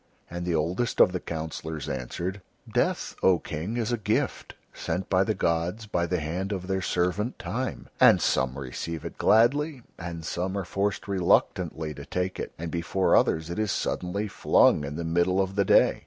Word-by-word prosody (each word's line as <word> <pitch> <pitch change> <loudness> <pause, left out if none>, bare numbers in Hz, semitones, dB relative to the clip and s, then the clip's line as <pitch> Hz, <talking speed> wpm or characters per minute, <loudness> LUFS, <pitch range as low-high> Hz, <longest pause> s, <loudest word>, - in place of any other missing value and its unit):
And 85 0 -4
the 85 - +1
oldest 90 +10 -1
of - - +7
the 90 - -2
councillors 80 -2 -5
answered: 85 +8 -4 0.3
"Death, - - 0
O 95 -2 +5
King, 85 +10 -4
is 115 0 -1
a 120 - 0
gift 100 - -1 0.2
sent 90 +3 -3
by 95 0 +4
the 110 +1 -1
gods 85 +6 -1
by 85 -5 -1
the 90 +1 0
hand 90 +6 -3
of 95 -3 -3
their 95 0 -1
servant 90 +6 0
Time, 115 +9 -4
and - - +7
some 65 0 +1
receive 75 +5 -5
it 85 - -7
gladly, 135 +4 +3 0.2
and 85 -2 -6
some 95 +4 -2
are 95 - -2
forced 100 +3 -2
reluctantly 85 -4 +1
to - - -9
take 90 +1 -3
it, - - -4
and 85 0 -5
before 85 +3 +1
others 80 +1 +2
it 85 - -3
is 110 -2 0
suddenly 100 +4 -2
flung 85 - +4
in 70 +1 -5
the 85 - -3
middle 85 +3 +1
of 95 0 0
the 100 0 +1
day. - - +4
90 Hz, 185 wpm, -27 LUFS, 80-100 Hz, 0.3 s, of